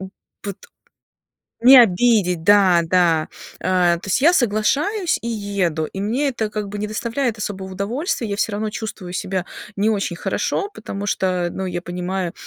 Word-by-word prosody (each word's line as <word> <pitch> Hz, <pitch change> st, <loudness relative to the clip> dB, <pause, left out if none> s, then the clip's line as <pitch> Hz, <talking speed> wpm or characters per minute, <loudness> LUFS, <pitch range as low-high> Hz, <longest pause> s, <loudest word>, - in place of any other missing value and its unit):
м, 190 Hz, 0 st, -8 dB, 0.3 s
вот 200 Hz, -2 st, -5 dB, 1.1 s
не 255 Hz, +3 st, +9 dB
обидеть. 195 Hz, -4 st, +2 dB
Да, 190 Hz, -3 st, +5 dB
да, 165 Hz, -2 st, +2 dB, 0.3 s
а, 180 Hz, -2 st, +2 dB
то 170 Hz, -, -11 dB
есть 195 Hz, +7 st, +1 dB
я 335 Hz, +4 st, +6 dB
соглашаюсь 290 Hz, -, +1 dB
и -, -, -3 dB
еду, 200 Hz, -8 st, -1 dB
и 195 Hz, -, -8 dB
мне 250 Hz, +8 st, 0 dB
это 225 Hz, -5 st, -3 dB
как 210 Hz, -2 st, -4 dB
бы 205 Hz, -, -6 dB
не 210 Hz, -, -2 dB
доставляет 235 Hz, +2 st, -2 dB
особого 190 Hz, -2 st, -5 dB
удовольствия. 235 Hz, -, -2 dB
Я 200 Hz, -, -1 dB
всё 220 Hz, -, 0 dB
равно 215 Hz, +1 st, -2 dB
чувствую 210 Hz, -5 st, -6 dB
себя 185 Hz, 0 st, -2 dB, 0.3 s
не 205 Hz, +2 st, +1 dB
очень 200 Hz, -5 st, -1 dB
хорошо, 400 Hz, -, -2 dB
потому 205 Hz, -1 st, -6 dB
что, 180 Hz, -3 st, 0 dB
ну, 190 Hz, -, -4 dB
я 175 Hz, -1 st, -3 dB
понимаю, 180 Hz, 0 st, -4 dB
200 Hz, 170 wpm, -20 LUFS, 180-225 Hz, 1.1 s, не